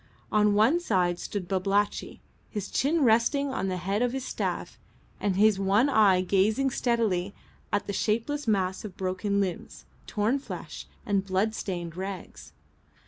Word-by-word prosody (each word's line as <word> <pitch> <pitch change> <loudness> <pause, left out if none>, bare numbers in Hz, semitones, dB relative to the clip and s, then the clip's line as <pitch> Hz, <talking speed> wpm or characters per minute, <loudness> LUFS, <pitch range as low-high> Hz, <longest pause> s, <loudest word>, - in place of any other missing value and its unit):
On 210 -1 +3
one 225 +11 +4
side 180 - +1
stood 195 -4 -4
Babalatchi, 195 +2 -1 0.3
his 205 -3 -5
chin 305 +3 +2
resting 245 +5 +3
on 195 - -1
the 185 -1 -2
head 195 +4 -1
of 245 0 +1
his 265 -1 -3
staff - - -3 0.4
and 200 -2 0
his 210 0 +4
one 200 +7 +3
eye 205 -7 +5
gazing 210 +8 +2
steadily 215 -7 0 0.4
at 205 - 0
the 200 - -4
shapeless 230 +8 -1
mass 190 -3 0
of 200 -4 -8
broken 190 +2 -1
limbs, 185 -4 -4 0.2
torn 225 +5 0
flesh, 275 - -8 0.2
and 200 -2 +1
bloodstained 190 -3 -2
rags. 190 0 -7
205 Hz, 145 wpm, -27 LUFS, 190-230 Hz, 0.4 s, eye